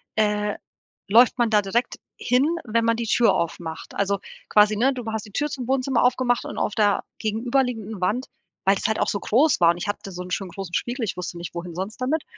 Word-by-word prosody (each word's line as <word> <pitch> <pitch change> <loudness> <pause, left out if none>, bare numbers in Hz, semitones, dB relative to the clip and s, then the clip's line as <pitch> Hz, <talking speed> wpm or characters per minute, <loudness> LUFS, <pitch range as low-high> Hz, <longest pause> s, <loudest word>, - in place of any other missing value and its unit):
äh, 210 -1 +1 0.5
läuft 235 +5 +5
man 235 -2 +2
da 210 -1 +5
direkt 230 +5 -1 0.2
hin, 250 +4 +2 0.2
wenn 230 +1 +1
man 230 0 +2
die 235 - -2
Tür 220 -3 +4
aufmacht.“ 165 -2 -4
Also, 200 0 +1 0.3
quasi, 210 0 +5
ne, 265 +5 +3
du 245 -2 -6
hast 220 -1 -3
die 210 - -14
Tür 295 +5 0
zum 260 -5 -5
Wohnzimmer 265 -1 +1
aufgemacht 250 -1 +2
und - - -6
auf - - -1
der 205 -3 +2 0.2
gegenüberliegenden 225 -2 -1
Wand 225 +8 0 0.4
weil 195 - +6
es - - -6
halt 220 - 0
auch - - +1
so 200 - -1
groß 275 - +3
war 170 0 +7
und 170 - -4
ich 185 +4 -5
hatte 200 -1 -4
so 180 0 -6
'n 180 - -10
schönen 195 0 -2
großen 180 0 -7
Spiegel, 240 +4 -1
ich 195 - -3
wusste 175 -1 -5
nicht, 170 0 -7
wohin 170 0 -5
sonst 195 +7 -5
damit. 295 +5 0
220 Hz, 230 wpm, -24 LUFS, 195-245 Hz, 0.5 s, war